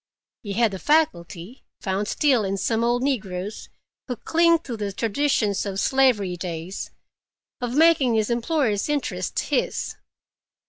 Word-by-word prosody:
He 205 -4 -5
had 225 +1 +2
the 190 - -6
faculty—found 205 - -1
still 265 -5 +2
in 195 0 -1
some 225 +3 0
old 240 +1 +1
negroes, 205 -7 -3 0.4
who 250 - -3
cling 335 +7 +3
to 245 - -5
the 205 -2 -3
traditions 225 -1 0
of 195 -1 -3
slavery 245 -10 +2
days—of 180 +7 -8
making 300 -6 +4
his 220 +1 +1
employer's 235 -2 0
interest 295 -2 -2
his. - - -1
230 Hz, 125 wpm, -24 LUFS, 195-270 Hz, 0.4 s, making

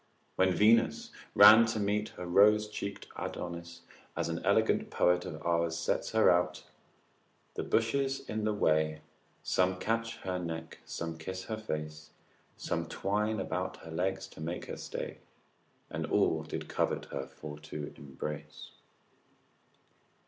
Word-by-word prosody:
When 95 0 +3
Venus 115 +5 +4 0.2
ran 110 +3 +10
to 110 -1 -1
meet 105 +1 0
her 90 - -5
rose 105 +4 +5
cheeked 100 -1 -5
Adonis, 85 0 -6 0.4
as - - -1
an - - -3
elegant - - +2
poet 90 0 +2
of 80 - -6
our's 85 -1 +1
sets 85 - -1
her 110 0 +5
out, 90 0 +1 0.9
———the - - -3
bushes 135 +4 +1
in 110 0 -2
the 110 - +2
way 80 -5 +1 0.4
Some 90 0 +2
catch 115 +3 -1
her 90 -1 -2
neck, 80 -2 -6
some 80 -1 -5
kiss 95 +3 -5
her 110 +2 -4
face, 75 -6 -5 0.5
Some - - -2
twine 105 +2 -1
about 95 -1 -3
her 80 - -8
legs 95 +3 -1
to - - -12
make 85 +3 -4
her - - -6
stay, - - -6 0.7
And - - -3
all - - +2
did - - -6
covet - - -1
her 65 - -4
for 75 +1 -9
to 75 -1 -7
embrace. 70 +1 -7
90 Hz, 140 wpm, -31 LUFS, 80-105 Hz, 0.9 s, ran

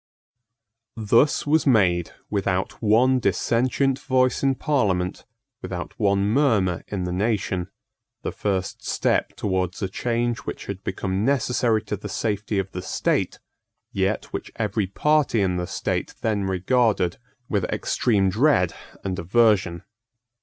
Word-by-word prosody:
Thus 115 +6 +3
was 155 +1 +2
made, 90 - +3 0.2
without 95 -2 -1
one 120 +4 +4
dissentient 125 +6 +1
voice 130 -2 +1
in 135 -1 +2
Parliament, 100 - 0 0.4
without 90 -1 -5
one 100 -2 +2
murmur 105 - +2
in 100 -3 -3
the 90 - -3
nation, 95 -2 -1 0.5
the - - -2
first 95 -2 -2
step - - 0
towards 95 -2 -1
a - - +1
change 120 +4 -1
which - - -7
had 100 -1 -6
become 95 +1 -2
necessary 125 -4 +1
to - - -3
the 105 +1 -8
safety 105 0 -2
of 95 0 -2
the 90 - -5
state, 95 - -1 0.5
yet 100 +2 0
which - - -5
every 105 -2 -1
party 150 +3 +2
in 95 -2 +1
the 90 0 -2
state - - -3
then 105 -3 0
regarded 95 -1 +1 0.3
with 100 -4 0
extreme 100 -5 +1
dread 110 - +3 0.3
and 95 -1 -3
aversion. 95 -3 +2
105 Hz, 130 wpm, -24 LUFS, 95-120 Hz, 0.5 s, one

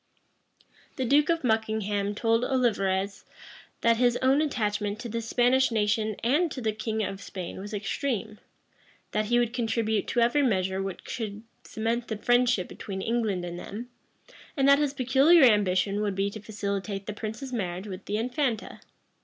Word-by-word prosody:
The 260 - -2
duke 290 +5 +4
of 335 -2 +1
Buckingham 215 -3 0
told 230 +2 +2
Olivarez, 200 -7 0 0.6
that 230 0 +4
his 245 0 +3
own 265 +3 +3
attachment 210 -7 -1
to 240 - -6
the 230 +1 -2
Spanish 245 +3 +3
nation 215 -1 0
and 300 +9 +2
to 275 - -6
the 220 -3 0
king 220 0 -2
of 195 0 -4
Spain 185 -2 -7
was 205 +2 -7
extreme; 215 +1 -3 0.7
that 215 0 0
he 240 +3 +2
would 240 -1 +1
contribute 225 -3 0
to 245 - 0
every 240 +5 +3
measure 190 -6 +1
which 195 -2 -5
could 215 -3 -5 0.2
cement 230 +2 -2
the 220 - -3
friendship 245 -3 +2
between 190 -2 -6
England 220 -6 -1
and 175 0 -6
them; 235 +7 -8 0.7
and 270 0 +3
that 280 0 +7
his 290 -1 0
peculiar 275 +5 +5
ambition 205 -3 +3
would 205 -2 -1
be 195 +1 0
to 215 - -8
facilitate 200 -1 -4
the 210 - -4
prince's 220 +5 -6
marriage 185 -4 -3
with 190 -1 -8
the 210 - -2
infanta. 245 0 -2
220 Hz, 165 wpm, -27 LUFS, 205-245 Hz, 0.7 s, that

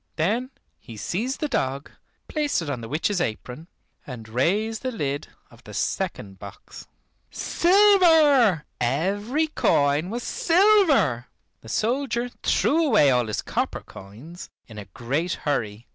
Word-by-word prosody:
Then 220 +11 -1 0.3
he 115 - -12
seized 230 - -3
the 305 - 0
dog, 135 - -3 0.4
placed 300 -2 -1
it 145 - -4
on 125 -4 -4
the 115 - -8
witch's 175 +5 -1
apron, 125 +5 -5 0.4
and 120 -5 -8
raised 200 - -1
the 255 - -3
lid 145 - -3 0.2
of - - -19
the - - -11
second 95 -2 -3
box. - - -12 0.4
Silver, 325 - +4
every 200 - 0
coin 145 - +1
was 235 +3 -4
silver! 340 - +3 0.3
The 110 - -13
soldier 245 - -1
threw 325 +4 +2
away 210 - +4
all 125 -2 +1
his 110 - -3
copper - - -3
coins 120 - -12 0.2
in 110 -2 -11
a 100 - -9
great 135 - -3
hurry. 115 -6 -2
175 Hz, 135 wpm, -24 LUFS, -, 0.4 s, Silver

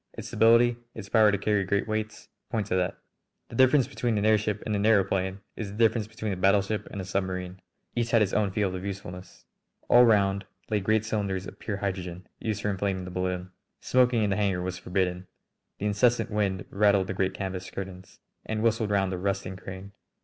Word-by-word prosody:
Its - - -7
stability, 115 +2 +5 0.2
its 100 -3 -8
power 110 -1 +5
to 100 - +1
carry 105 0 +1
great 100 +3 0
weights, 110 0 -3 0.2
point 110 -3 -1
to 90 - -1
that. 90 +1 0 0.5
The - - -9
difference 130 +1 +5
between 120 -5 -1
an 105 - 0
airship 105 -1 +2
and 105 - -1
an 100 - 0
aëroplane 95 -2 +2
is 110 -3 -5
the 100 - -9
difference 110 -1 +2
between 110 -1 -4
a - - -5
battleship 100 +2 +2
and 100 - -6
a 95 - -4
submarine. 95 -1 -3 0.3
Each 120 -1 0
has 115 -2 +4
its 95 - -2
own 105 -2 +2
field 100 -1 -1
of 90 0 -5
usefulness." 95 -2 -8 0.4
All 120 0 +8
round 100 -4 +3 0.3
lay 105 - +2
great 110 +2 +1
cylinders 100 -4 -2
of - - -10
pure 105 -3 -3
hydrogen, 95 -2 -4
used 110 -2 -3
for 105 - +1
inflating 95 -1 -2
the 90 - -7
balloon. 90 0 -3 0.3
Smoking 125 -3 +3
in 100 - +1
the 100 - +1
hangar 95 -4 0
was 90 0 -4
forbidden. 90 0 -1 0.5
The 105 - -4
incessant 115 +3 +2
wind 100 -3 -1
rattled 100 -1 +3
the 95 - -4
great 95 0 -1
canvas 95 -2 -4
curtains 95 -1 -8 0.2
and 110 0 -3
whistled 115 -1 +1
round 100 -2 +1
the 90 - -3
rusting 95 -1 -2
crane. 95 +1 -9
100 Hz, 200 wpm, -27 LUFS, 95-110 Hz, 0.5 s, All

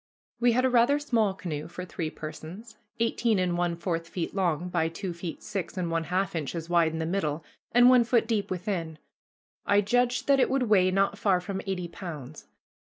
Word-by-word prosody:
We 240 -1 +4
had 255 +2 +2
a - - +4
rather 245 +4 +4
small 230 -9 +1
canoe 155 -6 -5
for 180 +2 -7
three 165 -3 -4
persons, 170 +9 -9 0.2
eighteen 230 -1 +1
and 180 -2 +1
one 175 -1 0
fourth 165 -1 -3
feet 170 -1 -4
long 175 -3 0
by 165 -2 0
two 175 +2 -5
feet 170 -1 -7
six 195 -2 -4
and 175 -2 -2
one 165 0 0
half 185 +1 -1
inches 160 +1 -3
wide 170 -2 +3
in 160 - -4
the 160 - -2
middle, 160 -3 -2 0.3
and 245 +1 +6
one 250 -1 +7
foot 235 -1 +2
deep 220 -3 0
within. 175 -4 -3 0.7
I 205 0 +3
judged 245 +4 +1
that 275 -1 +5
it - - +3
would 270 -1 +1
weigh 200 -5 +4
not 195 +2 +1
far 190 -3 +3
from 190 +2 -4
eighty 180 -2 -2
pounds. 155 -6 -8
185 Hz, 200 wpm, -27 LUFS, 165-220 Hz, 0.7 s, one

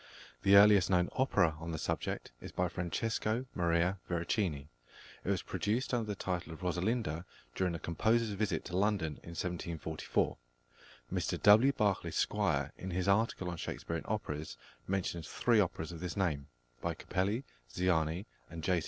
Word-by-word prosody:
The 100 0 +6
earliest 100 -2 +8
known 90 -2 +3
opera 85 - +2
on 80 +1 -6
the - - -2
subject - - -3
is - - -8
by 90 - 0
+Francesco 110 +7 -1
Maria 85 +2 +1
Veracini+. 85 -4 -1 0.6
It - - -3
was - - +1
produced 120 +6 -1
under 115 -3 +1
the 105 - -2
title 90 -3 -3
of 80 - -9
Rosalinda 90 -1 0 0.3
during 90 +3 0
the - - -2
composer's 110 +7 +1
visit 100 -4 -1
to 90 - -5
London 95 -6 +1
in 85 - -9
1744. 85 -3 -2 0.8
Mr - - -1
W. 110 +6 +8
Barclay 100 -6 +1
Squire, - - 0
in 95 - -5
his 90 +1 -1
article 100 -2 +2
on 85 -1 -3
Shakespearian 85 0 -4
operas, 75 - -3 0.3
mentions 90 -4 -2
three 115 -3 +3
operas 85 -4 0
of 85 - -7
this 90 0 -4
name, 75 -8 0 0.3
by - - -1
Capelli, 100 +7 -1 0.3
Ziani, 85 0 +1 0.2
and 80 -1 -7
J. 90 0 +2
90 Hz, 155 wpm, -33 LUFS, 85-105 Hz, 0.8 s, earliest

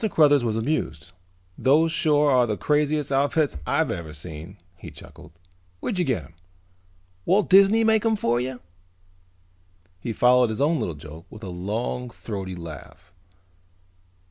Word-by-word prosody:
Cruthers 145 -6 +4
was 110 -2 -1
amused. 110 - -3 0.5
"Those 155 +5 +3
sure 150 -3 +2
are 125 -2 +4
the 105 -2 -2
craziest 150 -1 0
outfits 140 - +1
I've - - +1
ever 80 -3 -6
seen," 80 +4 -8 0.2
he - - -11
chuckled. 80 - -14 0.5
"Where'd 190 - -3
you 175 - +1
get 120 - -1
them? 75 +5 -17 0.9
Walt 195 +3 +1
Disney 200 +4 +6
make 220 -1 +3
them 225 0 +1
for 120 - 0
you?" 125 0 -5 1.4
He 115 - -4
followed 125 +1 +4
his 110 - -4
own 150 +2 +2
little 90 -8 -3
joke 80 +3 -12
with 110 0 -12
a 95 - -6
long 110 +7 -4
throaty 95 -5 -6
laugh. 85 +2 -11
125 Hz, 145 wpm, -24 LUFS, 90-150 Hz, 1.4 s, Disney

